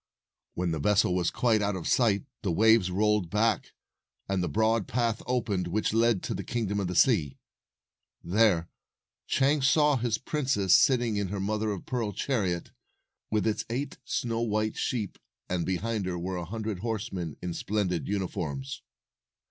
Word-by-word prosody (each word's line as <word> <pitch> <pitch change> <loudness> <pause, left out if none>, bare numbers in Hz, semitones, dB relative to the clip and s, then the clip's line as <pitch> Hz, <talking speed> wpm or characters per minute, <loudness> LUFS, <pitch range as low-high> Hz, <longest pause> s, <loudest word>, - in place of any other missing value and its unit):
When 90 -1 -1
the 80 - -2
vessel 100 +2 +3
was 90 -1 +1
quite 115 -3 +2
out 100 -1 0
of 90 - -4
sight, 110 -5 +2 0.2
the 95 - -1
waves 110 +1 +4
rolled 105 -1 +1
back, 105 +3 +1 0.5
and 95 -1 0
the 90 - -1
broad 110 -1 +1
path 115 -2 0
opened 105 -8 0
which 105 +4 0
led 115 -3 +2
to - - -2
the - - -4
Kingdom 105 -4 -2
of 100 - -1
the 90 - -4
Sea. 85 - +3 0.9
There 90 -2 +3 0.6
Chang 140 +2 +2
saw 150 +1 +4
his 120 -2 0
princess 130 - +1
sitting 120 -6 +4
in 100 -1 -1
her 100 +2 -4
mother 105 +2 -1
of 100 -3 -4
pearl 115 -5 -2
chariot, 95 -7 -1 0.6
with 110 -1 0
its 110 -2 0
eight 130 +4 -3
snow 115 -2 -2
white 110 -1 0
sheep, 110 -6 -2 0.3
and 90 -2 -1
behind 100 +2 -1
her 90 -1 -2
were 90 +2 -3
a 85 - -4
hundred 110 0 -4
horsemen 100 -7 -4
in 90 -1 -4
splendid 95 -6 -1
uniforms. 85 -9 -3
105 Hz, 165 wpm, -28 LUFS, 90-115 Hz, 0.9 s, waves